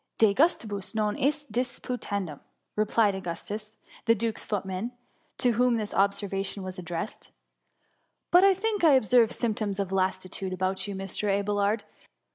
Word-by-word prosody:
*" - - -56
^^ - - -56
De 220 -3 +5
gustibus 220 - +1
non 210 -1 +1
est 290 -1 -1
disputandum/* 210 - -3 0.4
replied 215 0 +3
Augustus, 200 +4 -5 0.3
the 230 -1 +5
duke^s 225 +1 -2
footman, 195 +2 -3 0.5
to 245 - +3
whom 245 +1 +3
this 210 -2 -3
observation 195 0 0
was 185 0 -5
addressed: 175 +3 -5 0.5
— - - -46
"But 355 +2 +7
I 390 -1 +6
think 415 0 -1
I 315 -3 +7
observe 245 -2 +5
symptoms 215 -4 -1
of 195 -2 -2
lassitude 185 0 -1
about 185 +2 -1
you, 200 - -4
Mr. 195 +2 -2
Abelard. 205 +1 +1
210 Hz, 150 wpm, -28 LUFS, 195-235 Hz, 0.5 s, But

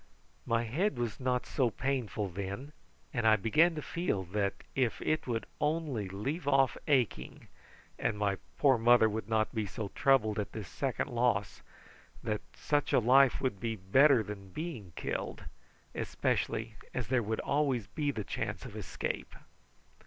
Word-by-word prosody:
My 115 0 +2
head 145 - 0
was 120 -3 -2
not 125 -1 0
so 130 -3 +1
painful 120 -4 -2
then, 100 - -5 0.4
and 120 -4 +1
I 110 - +7
began 155 - +3
to 150 - -4
feel 170 - -1
that 100 -1 0 0.2
if 125 -4 0
it 155 -2 0
would 115 -2 -1
only 150 - -1
leave 135 - -3
off 135 -2 +4
aching 130 -7 0 0.5
and 105 - 0
my 100 -2 +1 0.2
poor 135 -5 +4
mother 120 0 +6
would 110 0 -4
not 110 -1 +1
be 110 -3 -1
so 100 +1 -5
troubled 110 -6 +3
at 105 - -3
this 105 -5 -6
second 135 +4 -2
loss, 120 -5 0 0.9
such 145 -1 0
a - - +6
life 130 +3 +5
would 125 -8 -1
be 115 +1 -2
better 120 +6 +5
than 100 -2 -8
being 125 - -6
killed, - - -4 0.5
especially 110 -1 -1 0.2
as 125 -2 -2
there 130 -2 +3
would 110 0 -2
always 140 -6 +1
be 145 +7 -2
the 110 -7 -2
chance - - -4
of - - -9
escape. - - -4
120 Hz, 155 wpm, -32 LUFS, 105-135 Hz, 0.9 s, I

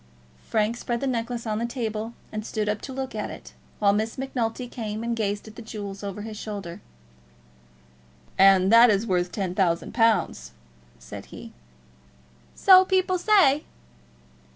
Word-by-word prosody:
Frank 220 +1 +1
spread 240 0 -3
the 275 - -3
necklace 240 -2 -2
on 215 -1 -2
the 235 - -1
table, 225 -2 -4 0.2
and 215 0 -4
stood 215 -1 -3
up 210 0 -1
to 270 - -7
look 265 -1 -5
at 210 -1 -4
it, - - -11 0.2
while 200 -1 +3
Miss 220 +2 -2
Macnulty 250 -2 -3
came 220 -2 -5
and 235 0 -1
gazed 205 -1 -2
at 215 - -12
the 235 - -9
jewels 205 -3 -7
over 200 +1 -5
his 215 -1 -7
shoulder. 200 -3 -7 1.5
"And 195 0 +5
that 235 +1 +8
is 205 +1 +2
worth 180 -3 0
ten 190 -4 -3
thousand 175 -3 0
pounds," 220 - +1 0.4
said - - -10
he. - - -11 1.0
"So 375 -1 +7
people 370 -1 +1
say." 345 -8 +4
220 Hz, 155 wpm, -25 LUFS, 205-240 Hz, 1.5 s, that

